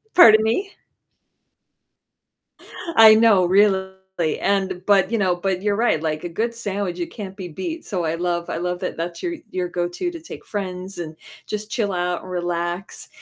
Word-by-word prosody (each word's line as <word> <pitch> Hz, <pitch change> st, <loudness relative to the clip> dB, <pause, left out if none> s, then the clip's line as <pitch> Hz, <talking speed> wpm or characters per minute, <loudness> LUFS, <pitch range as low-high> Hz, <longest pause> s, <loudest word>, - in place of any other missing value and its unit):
pardon 220 Hz, -10 st, +8 dB
me? 375 Hz, -, -1 dB, 2.2 s
I 220 Hz, -1 st, +10 dB
know, 215 Hz, -5 st, +5 dB
really, 190 Hz, 0 st, +3 dB, 0.5 s
and 190 Hz, -2 st, 0 dB
but, 200 Hz, 0 st, +4 dB
you 230 Hz, -, +2 dB
know 185 Hz, -3 st, +2 dB
but 185 Hz, +1 st, -2 dB
you're 205 Hz, -1 st, +1 dB
right, 225 Hz, -9 st, +1 dB
like 155 Hz, +1 st, -2 dB
a -, -, -2 dB
good 230 Hz, +7 st, -2 dB
sandwich, 200 Hz, -5 st, -3 dB
it 170 Hz, -, -4 dB
can't 195 Hz, -3 st, -7 dB
be 185 Hz, -3 st, -6 dB
beat, 325 Hz, -, -5 dB
so 180 Hz, -5 st, -3 dB
I 160 Hz, -, 0 dB
love 170 Hz, 0 st, -2 dB
I -, -, -2 dB
love 180 Hz, 0 st, -2 dB
that -, -, -4 dB
that's 170 Hz, +1 st, -5 dB
your 345 Hz, -1 st, -2 dB, 0.2 s
your 180 Hz, -1 st, -2 dB
go-to 175 Hz, -, -2 dB
to 335 Hz, -2 st, -8 dB
take 330 Hz, -, -10 dB
friends 185 Hz, -2 st, -5 dB
and 160 Hz, -2 st, -6 dB, 0.3 s
just 215 Hz, +1 st, -5 dB
chill 210 Hz, -5 st, -1 dB
out 180 Hz, 0 st, -1 dB
and -, -, -10 dB
relax. 175 Hz, +1 st, -3 dB
190 Hz, 175 wpm, -22 LUFS, 175-215 Hz, 2.2 s, I